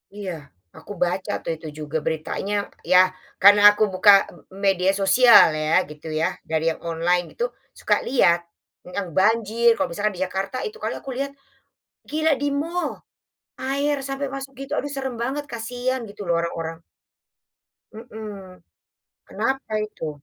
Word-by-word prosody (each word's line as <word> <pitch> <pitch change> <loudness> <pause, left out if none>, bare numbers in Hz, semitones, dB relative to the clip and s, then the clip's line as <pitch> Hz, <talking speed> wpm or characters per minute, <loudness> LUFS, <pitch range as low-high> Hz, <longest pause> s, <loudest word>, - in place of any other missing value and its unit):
Iya 200 -3 -5 0.5
aku - - -12
baca 180 +2 -2
tuh - - -2
itu 160 - -10
juga 150 +1 -3
beritanya 160 +6 -3 0.4
ya 180 - +8 0.4
karena 205 +1 +8
aku 215 - +1
buka 205 +2 +6 0.5
media 190 -1 +3
sosial 235 +5 +7 0.2
ya 155 +1 0 0.2
gitu 150 +1 -11
ya - - +3 0.2
dari 160 0 0
yang 160 - -5
online 175 +2 +1
gitu, 480 - -1 0.3
suka - - +2
lihat, 175 -10 +4 0.6
yang 200 -3 -2
banjir 225 +3 +3
kalau - - 0
misalnya 205 +5 -1
di - - -6
Jakarta 195 +5 -4
itu 430 - -9
kalau - - -2
aku 270 - -9
lihat, 275 0 -2 0.8
gila 315 +1 +1
di 290 - +1
mall, 345 +2 -2 0.7
air 280 +2 0
sampai 275 +1 -3
masuk 270 0 -6
gitu 275 - -8
aduh 290 - -2
serem 265 -2 -3
banget 280 +4 -3
kasihan 245 +3 -3
gitu 205 0 -11
loh 170 - +1
orang-orang. 165 -1 -5 1.1
Mhm, 210 -5 -10 0.7
kenapa 265 -4 -3
itu? 160 -6 -7
210 Hz, 145 wpm, -23 LUFS, 180-265 Hz, 1.1 s, ya